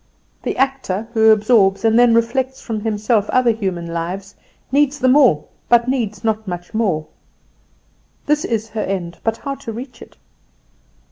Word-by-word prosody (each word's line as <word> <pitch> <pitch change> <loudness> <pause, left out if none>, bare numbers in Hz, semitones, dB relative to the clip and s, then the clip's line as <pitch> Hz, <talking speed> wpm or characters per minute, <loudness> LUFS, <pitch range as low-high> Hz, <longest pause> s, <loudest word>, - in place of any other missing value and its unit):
The - - -3
actor, 260 -6 -1
who 220 -1 +4
absorbs 215 -2 +3
and 225 +1 +4
then 240 -1 +5
reflects 255 +3 0
from 225 -2 -4
himself 215 0 0
other 250 -2 +3
human 190 -6 -3
lives, 175 +4 -5 0.4
needs 285 +1 +2
them 255 -1 +3
all, 220 - +4 0.2
but 240 0 +4
needs 225 -6 -2
not 220 -1 -1
much 175 +2 -6
more. 190 -9 0 1.2
This 300 0 +1
is 225 -1 -2
her 220 0 -4
end; 175 -4 -4
but 225 0 0
how 275 - -5
to 230 - -7
reach 245 +4 -9
it? - - -14
225 Hz, 155 wpm, -19 LUFS, 195-245 Hz, 1.2 s, then